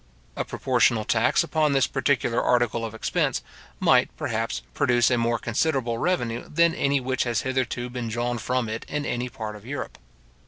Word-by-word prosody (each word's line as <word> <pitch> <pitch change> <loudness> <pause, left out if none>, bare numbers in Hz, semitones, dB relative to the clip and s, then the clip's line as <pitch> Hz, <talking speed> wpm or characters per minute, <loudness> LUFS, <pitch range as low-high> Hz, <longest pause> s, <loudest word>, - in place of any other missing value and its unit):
A - - -1
proportional 110 -2 +1
tax 115 +8 +3
upon 155 -2 +1
this 135 -2 +4
particular 130 -3 +1
article 120 -2 +1
of 115 -1 -5
expense - - 0 0.4
might, - - +4
perhaps, - - -2
produce 120 - +3
a 120 - +3
more 115 0 +1
considerable 120 0 0
revenue 120 -10 -1
than 170 +1 +3
any 140 0 +1
which 130 0 -1
has 120 -3 0
hitherto 130 -2 -1
been 125 -1 -5
drawn 120 +2 -2
from 125 +1 -1
it 110 +1 -4
in 150 -1 -2
any 120 +1 -2
part 110 -4 -6
of 105 - -12
Europe. 140 +5 -6
120 Hz, 170 wpm, -25 LUFS, 115-135 Hz, 0.4 s, this